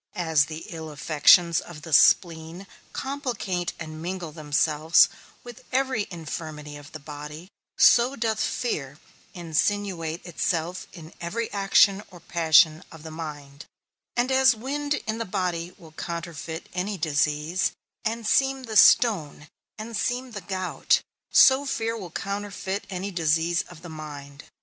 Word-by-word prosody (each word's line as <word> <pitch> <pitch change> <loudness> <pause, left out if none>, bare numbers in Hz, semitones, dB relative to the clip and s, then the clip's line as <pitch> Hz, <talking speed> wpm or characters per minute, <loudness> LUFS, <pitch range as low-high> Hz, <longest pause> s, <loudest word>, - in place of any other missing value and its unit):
As 160 -5 +3
the 155 +1 -8
ill 160 -2 -7
affections 160 +3 +4
of 150 -4 -11
the 160 - -7
spleen 165 +4 +3 0.3
complicate 245 -10 -3
and 155 -1 -7
mingle 175 -1 -5
themselves 155 +1 +3 0.3
with 240 -2 -11
every 260 -5 0
infirmity 155 -3 -7
of 145 0 -12
the - - -7
body, 150 +4 -9 0.3
so 245 +3 +5
doth 220 -2 -1
fear 145 - -2 0.4
insinuate 175 0 -1
itself 175 +1 -2
in 165 -3 -12
every 220 +7 -3
action 195 0 +4
or 180 - -13
passion 160 -1 +4
of 160 -2 -12
the 160 - -8
mind; 145 -3 -8 0.5
and 245 +2 +1
as 260 -2 +5
wind 285 +5 -2
in 220 +1 -3
the - - -1
body 180 -3 -3
will 160 -2 -15
counterfeit 165 0 -6
any 190 +3 -2
disease, 155 +2 0 0.3
and 230 0 -2
seem 270 +3 +2
the 220 -3 -1
stone, 165 - +4 0.3
and 220 +2 -7
seem 245 +4 -2
the 205 -3 -6
gout, 185 -2 0 0.3
so 265 +1 +7
fear 230 -4 -2
will 195 -6 -7
counterfeit 200 +1 -4
any 190 +1 -4
disease 165 0 +1
of 175 -2 -13
the - - -8
mind. 145 -3 -9
175 Hz, 140 wpm, -25 LUFS, 155-210 Hz, 0.5 s, so